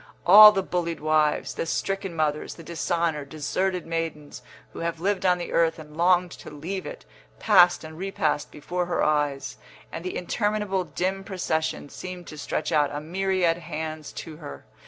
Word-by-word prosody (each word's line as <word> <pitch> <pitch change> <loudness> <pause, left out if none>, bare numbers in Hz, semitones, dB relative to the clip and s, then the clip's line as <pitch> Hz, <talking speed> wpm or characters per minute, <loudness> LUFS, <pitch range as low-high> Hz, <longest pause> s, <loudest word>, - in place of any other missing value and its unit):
All 210 +4 +11
the 195 -2 -1
bullied 170 -3 -2
wives, 155 0 +1
the - - -3
stricken 195 0 -2
mothers, 150 -1 -1
the 165 - -11
dishonoured, 165 -3 -2
deserted 180 +5 -2
maidens 165 -3 -4 0.3
who - - -8
have 165 -1 -3
lived 190 +1 0
on 180 0 +4
the 175 - -6
earth 165 -1 +2
and 150 -1 -12
longed 180 +1 +3
to - - -10
leave 170 +6 -5
it, - - -9 0.3
passed 180 -6 +5
and 155 0 -9
repassed 160 -6 -1
before 175 +4 -4
her 175 - 0
eyes, 145 -2 0 0.3
and 165 - -6
the 185 - -4
interminable 205 0 -1
dim 190 +2 -2
procession 160 -7 -2
seemed 180 +3 -8
to 155 - -10
stretch - - -2
out 145 -2 +3
a 145 - -3
myriad 180 +1 0
hands 155 -2 -6
to 160 -2 -8
her. 70 - -10
170 Hz, 170 wpm, -25 LUFS, 155-185 Hz, 0.3 s, All